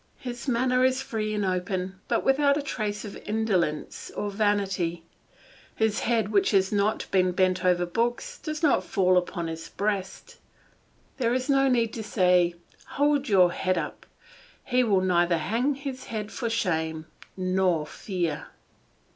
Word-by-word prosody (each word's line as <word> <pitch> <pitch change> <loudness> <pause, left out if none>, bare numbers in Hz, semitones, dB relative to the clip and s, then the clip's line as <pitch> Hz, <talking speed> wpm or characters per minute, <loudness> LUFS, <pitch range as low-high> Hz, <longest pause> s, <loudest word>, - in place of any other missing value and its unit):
His 245 0 -7
manner 250 +1 +2
is 260 0 +3
free 215 -2 -3
and 205 -1 0
open, 185 0 -2
but - - 0
without 280 +1 +3
a 295 - -2
trace 215 -6 -3
of 205 - -8
insolence 200 -8 -1
or 205 - -2
vanity; 195 -5 0 0.7
his 220 -1 +1
head 225 -3 0
which 200 -2 +3
has 190 -2 +2
not 205 +1 +1
been 185 -1 +3
bent 185 0 +1
over 180 -1 +3
books 240 - -2
does 310 0 -5
not 280 -11 +3
fall 185 0 +2
upon 175 -1 0
his 165 0 -6
breast; 200 -2 -3 0.8
there 240 -2 +1
is 255 +2 0
no 270 0 +4
need 235 -3 +2
to 225 - -4
say, 180 -4 +3 0.4
"Hold 285 -1 +2
your 185 -3 +5
head 185 +1 0
up," - - -5 0.6
he 250 0 +2
will 200 -5 +3
neither 175 -2 +2
hang 230 - 0
his 265 -1 -6
head 215 -2 -5
for 235 - -3
shame 160 -7 -1 0.5
or 180 -5 +2
fear. 175 -1 -3
205 Hz, 155 wpm, -26 LUFS, 180-240 Hz, 0.8 s, your